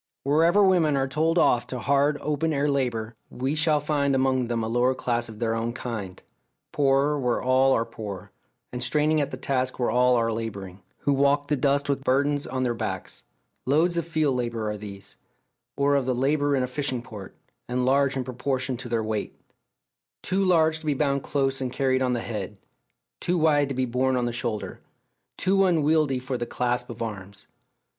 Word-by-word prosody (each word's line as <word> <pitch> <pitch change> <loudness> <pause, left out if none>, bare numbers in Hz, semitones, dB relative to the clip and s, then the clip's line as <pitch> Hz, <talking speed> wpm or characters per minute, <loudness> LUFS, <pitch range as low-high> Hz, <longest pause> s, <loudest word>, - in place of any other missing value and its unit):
Wherever 165 +8 +4
women 170 -7 +3
are 135 0 +1
told 160 +5 0
off 120 -7 +3
to 130 - -4
hard 140 +3 +2
open 150 +2 -1
air 145 0 +1
labour, 120 -5 -1 0.2
we 130 +3 -2
shall 155 0 +2
find 145 -2 0
among 130 -2 +1
them 115 -1 -1
a - - -2
lower 120 +3 +2
class 120 -2 -1
of 110 - -10
their 115 0 -1
own 115 +1 -2
kind 110 -7 -6 0.5
poorer 140 +1 +2
where 125 -2 0
all 130 +1 +3
are 115 - +1
poor, 105 -6 -8 0.4
and 125 - -4
straining 150 +4 +2
at 140 - -1
their - - -7
task 130 -1 -1
where 120 -3 0
all 125 +1 +4
are 115 -1 +1
labouring 100 -4 -6 0.2
who 145 - +2
walk 140 +1 +2
the 150 - +3
dust 140 +1 +1
with 140 -1 -1
burdens 145 +2 +1
on 130 0 -2
their 120 -2 0
backs. 115 - -5 0.4
Loads 160 +6 +2
of 170 -1 -1
field 155 -5 +1
labour 115 -3 -2
are - - -4
these, 100 -1 -10 0.6
or 140 0 +2
of 140 -2 +1
the 130 - +1
labour 145 +2 +1
in 130 - +1
a - - -1
fishing 130 -2 -2
port, 105 -6 -10 0.3
and 125 +1 -1
large 135 +1 +2
in 130 - -1
proportion 130 +1 -2
to 125 0 -8
their 115 -1 0
weight; 110 -1 -4 0.8
too 190 +1 0
large 160 -4 +3
to 160 - -10
be 145 - +1
bound 140 -1 0
close 135 -1 -1
and 130 -1 -2
carried 130 0 +1
on 125 -1 +1
the 120 - -1
head, 105 -3 -5 0.6
too 180 - 0
wide 150 -3 +3
to 135 - -3
be 130 0 0
borne 130 +2 0
on 125 - 0
the 120 - -2
shoulder, 115 -2 -4 0.6
too 195 +1 +2
unwieldy 155 -5 +2
for 130 0 -4
the 120 - -3
clasp 125 0 -1
of 115 0 -5
arms. 100 -3 -8
130 Hz, 195 wpm, -25 LUFS, 120-145 Hz, 0.8 s, Wherever